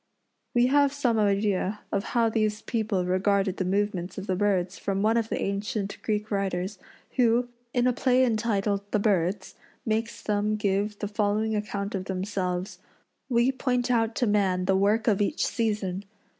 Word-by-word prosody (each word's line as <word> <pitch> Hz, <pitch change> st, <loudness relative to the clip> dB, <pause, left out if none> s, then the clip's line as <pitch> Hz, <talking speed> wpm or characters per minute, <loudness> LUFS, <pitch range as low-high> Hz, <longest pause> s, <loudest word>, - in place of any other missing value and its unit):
We 240 Hz, 0 st, +5 dB
have 285 Hz, +2 st, +4 dB
some 250 Hz, -6 st, +1 dB
idea 200 Hz, 0 st, +1 dB
of 200 Hz, +2 st, -1 dB
how 230 Hz, -1 st, +4 dB
these 215 Hz, -1 st, 0 dB
people 215 Hz, -5 st, -1 dB
regarded 195 Hz, +1 st, +1 dB
the 185 Hz, -, -1 dB
movements 190 Hz, -2 st, -1 dB
of 195 Hz, -, -5 dB
the 185 Hz, -, 0 dB
birds 190 Hz, -2 st, 0 dB
from 195 Hz, 0 st, -1 dB
one 220 Hz, +1 st, +3 dB
of 230 Hz, -1 st, 0 dB
the -, -, -2 dB
ancient 200 Hz, 0 st, -2 dB
Greek 210 Hz, 0 st, -2 dB
writers, 195 Hz, -1 st, -2 dB, 0.4 s
who, 245 Hz, 0 st, +3 dB, 0.2 s
in 245 Hz, 0 st, +1 dB
a 250 Hz, -, +3 dB
play 255 Hz, +1 st, +3 dB
entitled 215 Hz, -3 st, 0 dB
"The 210 Hz, -, +1 dB
Birds," 195 Hz, -2 st, 0 dB, 0.3 s
makes 225 Hz, +1 st, -2 dB
them 210 Hz, 0 st, 0 dB
give 205 Hz, 0 st, 0 dB
the 205 Hz, -, -3 dB
following 210 Hz, +1 st, 0 dB
account 205 Hz, -1 st, -3 dB
of 190 Hz, -2 st, -3 dB
themselves: 185 Hz, -1 st, -3 dB, 0.5 s
"We 240 Hz, +1 st, +3 dB
point 250 Hz, -2 st, 0 dB
out 225 Hz, -2 st, +1 dB
to 245 Hz, -, +1 dB
man 195 Hz, -4 st, +1 dB
the 190 Hz, 0 st, +3 dB
work 205 Hz, +3 st, +2 dB
of 210 Hz, -3 st, +3 dB
each 205 Hz, -, +1 dB
season. 205 Hz, -4 st, -1 dB
210 Hz, 170 wpm, -27 LUFS, 195-225 Hz, 0.5 s, We